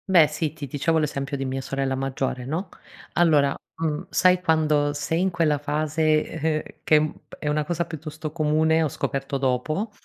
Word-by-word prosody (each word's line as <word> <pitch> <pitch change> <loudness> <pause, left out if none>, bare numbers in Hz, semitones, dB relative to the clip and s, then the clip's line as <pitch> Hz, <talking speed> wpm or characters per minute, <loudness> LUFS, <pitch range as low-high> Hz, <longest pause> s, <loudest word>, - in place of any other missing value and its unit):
Beh 170 -5 +7
sì, 150 0 -2
ti 145 - -6
dicevo 145 +4 0
l'esempio 140 -2 -1
di 135 - -3
mia 135 0 -2
sorella 135 0 -2
maggiore, 130 -1 -2
no: 165 +8 -3 0.4
allora, 150 -5 +4 0.2
mhmm, 160 +1 -2
sai 180 -1 +4
quando 155 -4 +2
sei 150 +4 -1
in 190 - +2
quella 165 -5 +1
fase, 150 +2 -1 0.3
e - - -7
ehm, 155 -1 +1 0.2
che 155 - +5
m 155 0 -1 0.2
è 150 - -5
una 150 +1 +1
cosa 170 +2 -1
piuttosto 155 -1 -6
comune, 160 0 +2
ho 155 - +1
scoperto 135 +1 -2
dopo; 135 - -1
155 Hz, 180 wpm, -24 LUFS, 140-160 Hz, 0.4 s, Beh